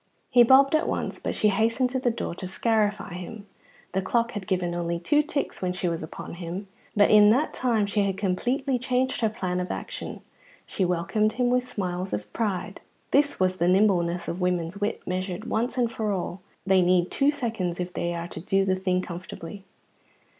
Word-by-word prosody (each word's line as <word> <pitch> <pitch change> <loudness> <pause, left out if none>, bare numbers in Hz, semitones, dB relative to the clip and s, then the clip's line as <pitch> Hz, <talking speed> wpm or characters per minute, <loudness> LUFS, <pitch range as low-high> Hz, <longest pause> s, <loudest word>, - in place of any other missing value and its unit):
He 245 - +7
bobbed 265 +4 +6
at 310 - +2
once, - - -2
but - - -3
she 215 - +3
hastened 230 +5 +1
to 260 - 0
the 250 - +1
door 230 - -3
to 185 +1 -6
scarify 210 -1 0
him. 200 +4 -8 0.5
The 190 - 0
clock 235 +4 0
had 205 -4 -6
given 180 -3 0
only 170 0 -1
two 295 - +3
ticks 295 -1 -3
when 180 -1 -1
she 180 0 -2
was 170 -1 -2
upon 155 - -8
him, 180 +4 -5 0.3
but 205 -1 +5
in 210 -1 +8
that 265 +8 +2
time 230 -5 +1
she 205 +1 0
had 195 -1 0
completely 245 +7 0
changed 255 +1 0
her 220 - +3
plan 185 -5 -2
of 180 - -3
action. - - -5 0.4
She 195 - -2
welcomed 195 +5 +1
him 245 +1 +1
with 250 0 +2
smiles 185 -5 -3
of 105 0 -4
pride. 205 -5 -2 0.3
Thus 285 0 +3
is 185 0 +2
the 175 - +1
nimbleness 180 -3 +2
of 175 +2 -4
women's 180 +1 -1
wit 205 - -2
measured 185 +2 -3
once 235 +4 -1
and 240 -2 +1
for 220 -2 -2
all. 185 -1 -3 0.2
They 190 -1 +4
need 180 0 +3
two 280 +1 +3
seconds 225 - -2
if 180 0 -4
they 170 -1 -2
are 170 0 -4
to - - -7
do 195 +3 +1
the 190 - +2
thing 185 -1 0
comfortably. 180 +2 -8
195 Hz, 200 wpm, -26 LUFS, 180-230 Hz, 0.5 s, in